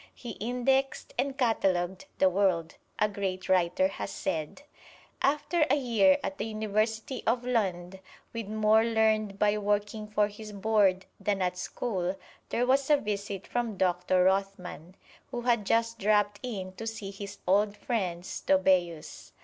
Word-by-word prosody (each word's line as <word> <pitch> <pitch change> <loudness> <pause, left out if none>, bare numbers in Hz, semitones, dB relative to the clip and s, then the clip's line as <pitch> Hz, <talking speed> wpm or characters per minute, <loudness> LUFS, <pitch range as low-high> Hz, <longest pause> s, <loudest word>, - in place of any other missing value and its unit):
"He 240 - -7
indexed 250 +4 0
and 275 -1 -1
catalogued 190 -7 +1
the 190 - +5
world," 185 -3 +1 0.2
a 210 - +3
great 195 -2 -4
writer 185 0 +3
has 195 - -5
said. 160 - -4 0.6
After 300 +3 +2
a - - +5
year 280 +1 +4
at 290 - -4
the 210 - -1
University 220 +3 -1
of 240 +2 +1
Lund, 190 -6 -1 0.3
with 230 -3 -4
more 215 +1 +3
learned 220 -3 +1
by 210 0 +2
working 210 +1 -1
for 210 0 +2
his 210 +1 -10
board 200 -2 +2
than 200 0 0
at 180 -1 0
school, 185 -1 -2 0.3
there 245 - +1
was 270 +2 +2
a 295 - +6
visit 200 -4 -4
from 235 -4 -2
Doctor 180 0 +2
Rothman, 190 -2 -1 0.3
who 240 - -4
had 235 -4 +1
just 230 0 +1
dropped 205 0 +2
in 200 -7 -5
to 225 - -5
see 215 -3 -5
his 200 0 -8
old 205 +2 +2
friend 185 -8 -2
Stobæus. 185 -4 0
210 Hz, 150 wpm, -29 LUFS, 190-230 Hz, 0.6 s, a